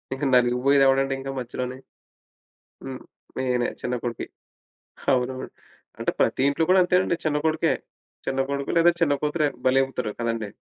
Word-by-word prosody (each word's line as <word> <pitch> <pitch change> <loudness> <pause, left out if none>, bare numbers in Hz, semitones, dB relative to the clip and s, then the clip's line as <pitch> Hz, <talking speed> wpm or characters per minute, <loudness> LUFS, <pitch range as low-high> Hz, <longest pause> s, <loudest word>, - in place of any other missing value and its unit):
ఇంక 135 - -7
నలిగిపోయేది 125 +3 +4
ఎవడండి 135 0 +2
ఇంక 135 - -6
మధ్యలోని? 125 +1 -5 1.0
హ్మ్. 130 -1 -7 0.4
నేనే 125 -2 +1
చిన్న 125 0 -2
కొడుకి. 120 -2 -3 0.9
అవునవును. 130 +1 -1 0.5
అంటే, - - 0
ప్రతి - - +2
ఇంట్లో 160 +3 0
కూడా 185 - +6
అంతేనండి, 180 -1 +2
చిన్న 150 -1 +1
కొడుకే. 160 0 +2 0.5
చిన్న 135 0 -1
కొడుకు 140 0 -2
లేదా 170 +1 +6
చిన్న 145 -4 +4
కూతురే 150 0 +1 0.2
బలవుతారు 130 -4 +1
కదండీ. 115 -3 -2
135 Hz, 135 wpm, -24 LUFS, 125-145 Hz, 1.0 s, కూడా